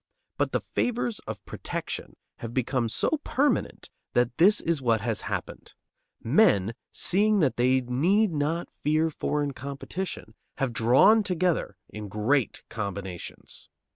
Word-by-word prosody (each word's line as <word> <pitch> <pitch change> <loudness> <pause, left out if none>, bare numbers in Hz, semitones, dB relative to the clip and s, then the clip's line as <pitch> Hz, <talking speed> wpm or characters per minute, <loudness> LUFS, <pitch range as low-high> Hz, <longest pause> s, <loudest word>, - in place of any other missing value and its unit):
But - - 0
the - - 0
favors 240 -2 -1
of 105 -4 -6
protection - - -5 0.2
have 115 0 -7
become 125 -2 0
so 305 - 0
permanent 285 +2 0 0.2
that 120 0 +2
this 205 +5 +6
is 165 -4 -1
what 115 -4 +2
has 115 -1 -2
happened: - - -5 0.5
Men, 115 - +4 0.2
seeing 210 +3 +3
that 140 -5 +2
they 130 +2 +3
need 175 - +2
not 160 +3 -1 0.2
fear 155 +2 +2
foreign 145 -1 -1
competition, 140 +8 -6 0.2
have 135 -4 -1
drawn 130 - +5
together 180 - 0
in 105 -1 -8
great 115 +6 0
combinations. 100 -4 -7
140 Hz, 130 wpm, -27 LUFS, 115-180 Hz, 0.5 s, this